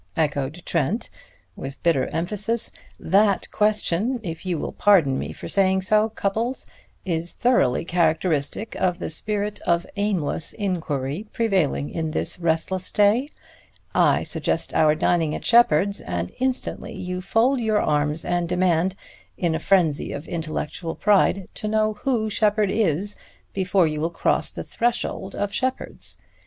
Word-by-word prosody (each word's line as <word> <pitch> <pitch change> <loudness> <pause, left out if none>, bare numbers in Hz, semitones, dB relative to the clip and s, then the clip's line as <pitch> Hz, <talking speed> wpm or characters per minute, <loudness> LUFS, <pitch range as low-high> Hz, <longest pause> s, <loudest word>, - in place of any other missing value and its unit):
echoed 150 +1 -1
Trent 170 - -1 0.4
with 135 0 -8
bitter 165 -6 +2
emphasis. 210 +7 +1 0.3
"That 200 +3 +2
question, 215 +2 +1
if 165 +1 -6
you 175 -2 0
will - - -4
pardon 165 -10 +3
me - - -4
for - - -8
saying 190 -1 +2
so, 215 +3 +3
Cupples, 220 +4 -2 0.4
is 170 -2 -1
thoroughly 240 - +2
characteristic 165 +2 0
of 180 -2 +1
the 180 - -4
spirit 210 +4 -2
of 170 0 0
aimless 190 -6 0
inquiry 165 -3 -3
prevailing 190 - 0
in 160 -1 -2
this 155 - -1
restless 170 +3 -1
day. 215 +7 +3 0.6
I - - +3
suggest - - -1
our 155 -1 +4
dining 160 -1 +1
at - - -6
Sheppard's 200 -4 +4
and 90 0 -4
instantly 260 0 -2
you 180 -1 -5
fold 235 +7 +2
your 220 -2 +1
arms 150 +1 0
and 175 -1 -1
demand, 180 0 +1 0.4
in 170 -3 0
a 160 - -1
frenzy 170 -7 +2
of 145 +3 -7
intellectual 165 0 -4
pride, 195 -2 +2
to 215 - -3
know 215 0 +1
who 230 -1 -1
Sheppard 210 -1 +2
is 200 -1 0 0.4
before 190 -1 +2
you 155 -1 -2
will 165 - 0
cross 170 - 0
the - - -6
threshold 230 -4 -2
of 205 -1 -2
Sheppard's. 260 0 -2
185 Hz, 145 wpm, -23 LUFS, 160-210 Hz, 0.6 s, our